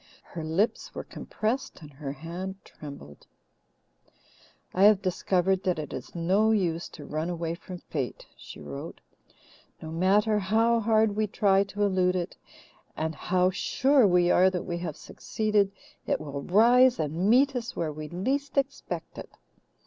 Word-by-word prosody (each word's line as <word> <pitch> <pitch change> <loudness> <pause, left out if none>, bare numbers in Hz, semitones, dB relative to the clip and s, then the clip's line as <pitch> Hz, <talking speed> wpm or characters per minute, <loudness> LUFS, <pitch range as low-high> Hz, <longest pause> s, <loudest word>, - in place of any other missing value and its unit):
Her 165 -3 -8
lips 165 +8 -1
were - - -4
compressed 230 +5 -4
and 145 -1 -12
her 135 0 -6
hand 170 +6 -6
trembled: 140 - -11 1.5
"I 190 +2 +4
have 205 -2 +5
discovered 185 0 +1
that 180 -3 0
it 150 -2 -5
is 130 - -8
no 190 +6 +2
use 175 -6 0
to 145 - -9
run 155 +4 -3
away 170 -1 -3
from 180 +1 -9
fate," 140 -7 -5
she - - -12
wrote. 70 -1 -8 0.8
"No 160 - -8
matter 205 +5 +2
how 225 +4 +2
hard 220 -1 +2
we 215 0 +1
try 195 -1 +3
to 205 +1 -3
elude 185 -2 +2
it, 175 -2 -3 0.6
and 160 0 -2
how 180 +4 +1
sure 265 +5 +3
we 180 -1 +3
are 185 +1 +5
that 180 -2 -3
we 175 -1 -3
have 165 -4 -5
succeeded, 210 -2 -1 0.4
it - - +1
will 140 -2 -6
rise 240 - +5
and 160 +5 -1
meet 270 +4 +4
us 245 +1 -4
where 155 -3 -2
we 155 0 -7
least 270 +11 -2
expect 275 0 -3
it. - - -9
185 Hz, 155 wpm, -27 LUFS, 165-215 Hz, 1.5 s, have